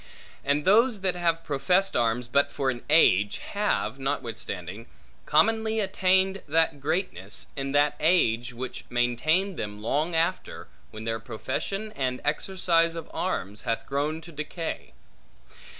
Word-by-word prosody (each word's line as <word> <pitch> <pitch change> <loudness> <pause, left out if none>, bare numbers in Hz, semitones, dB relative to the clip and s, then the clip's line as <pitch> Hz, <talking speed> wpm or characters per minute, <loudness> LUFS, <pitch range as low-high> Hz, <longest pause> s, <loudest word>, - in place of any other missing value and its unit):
And 145 +1 +1
those 220 +2 +4
that 185 -1 +1
have 170 -2 0
professed 180 +7 +2
arms 120 +1 +1
but 140 +3 +2
for 135 -1 0
an 120 -1 -7
age, 105 - +4
have, 205 -9 -1
notwithstanding, 115 -6 -4 0.4
commonly 220 +7 +3
attained 190 -1 +2
that 160 -1 +2
greatness, 150 - -2
in 135 0 -3
that 145 0 +3
age, 120 -8 +2
which 125 +2 -6
maintained 155 +11 +1
them 105 -1 -5
long 150 +10 -1
after, 170 +3 -1 0.2
when 110 - -9
their 115 0 -2
profession 130 - -4
and 130 -2 -1
exercise 165 +1 +1
of 165 -2 -7
arms 105 - -2
hath 115 -2 -2
grown 150 +3 -2
to 170 - -11
decay. 155 - -5
150 Hz, 135 wpm, -27 LUFS, 120-180 Hz, 0.4 s, those